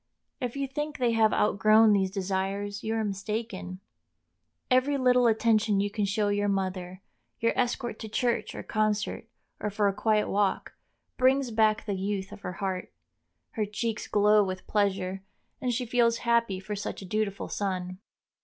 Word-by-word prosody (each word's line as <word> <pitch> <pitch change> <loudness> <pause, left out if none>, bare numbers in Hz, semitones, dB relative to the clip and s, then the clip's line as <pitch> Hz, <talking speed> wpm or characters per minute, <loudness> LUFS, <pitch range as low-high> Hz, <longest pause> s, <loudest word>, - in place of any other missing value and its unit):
If 245 0 -3
you 275 - 0
think 295 +2 -4
they 245 -2 +2
have 220 -1 +4
outgrown 215 +1 +4
these 190 -2 +2
desires, 195 +1 -3
you 220 +1 -1
are 220 - 0
mistaken. 195 -2 -4 0.9
Every 260 +3 +3
little 250 -2 +4
attention 220 -2 +3
you 205 +1 0
can 210 -1 0
show 205 +1 0
your 205 0 +1
mother—your 190 +3 -3
escort 240 -2 -1
to 220 - -7
Church 240 +2 -1
or - - -6
concert, 215 -1 -1 0.3
or 210 - -2
for 205 0 +1
a 200 - +1
quiet 215 +1 +1
walk—brings 255 +5 -1
back 215 -1 +2
the 205 - -2
youth 195 0 -3
of - - -10
her 180 - -5
heart; 185 0 -4 0.6
her 215 -3 -1
cheeks 220 +1 -3
glow 210 0 +4
with 185 -1 -5
pleasure, 195 -2 0 0.4
and 250 - 0
she 245 +1 -1
feels 235 -1 +2
happy 235 -5 +2
for 210 +2 -5
such 200 -1 -5
a - - -8
dutiful 205 +1 -2
son. 185 -2 -3
210 Hz, 160 wpm, -28 LUFS, 195-230 Hz, 0.9 s, have